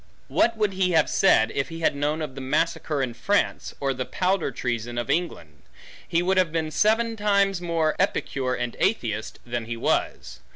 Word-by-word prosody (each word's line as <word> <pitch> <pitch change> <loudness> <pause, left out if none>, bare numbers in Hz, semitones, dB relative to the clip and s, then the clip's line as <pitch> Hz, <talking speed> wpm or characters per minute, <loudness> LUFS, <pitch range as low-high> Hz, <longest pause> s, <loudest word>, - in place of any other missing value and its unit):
What 230 -1 +2
would 210 -2 +1
he 185 -1 +1
have 160 -2 +4
said, 115 -12 +4
if 135 - -2
he 165 0 -7
had 160 - +2
known 150 +2 -1
of 150 - -5
the 135 - -7
massacre 145 +1 0
in 125 -2 -3
France, 205 - -1
or 135 -1 0
the 130 0 -3
powder 185 +4 0
treason 120 -2 -3
of 120 -1 -1
England? 85 - -3 0.5
He 170 +1 +1
would 190 +1 +1
have 180 -4 +3
been 160 -1 -2
seven 225 +5 +2
times 200 -3 +2
more 165 -3 0
Epicure, 135 -9 0
and 120 -1 -3
atheist, 110 - -1
than 120 -1 -3
he 115 0 -5
was. 65 - -1
155 Hz, 190 wpm, -25 LUFS, 120-185 Hz, 0.5 s, have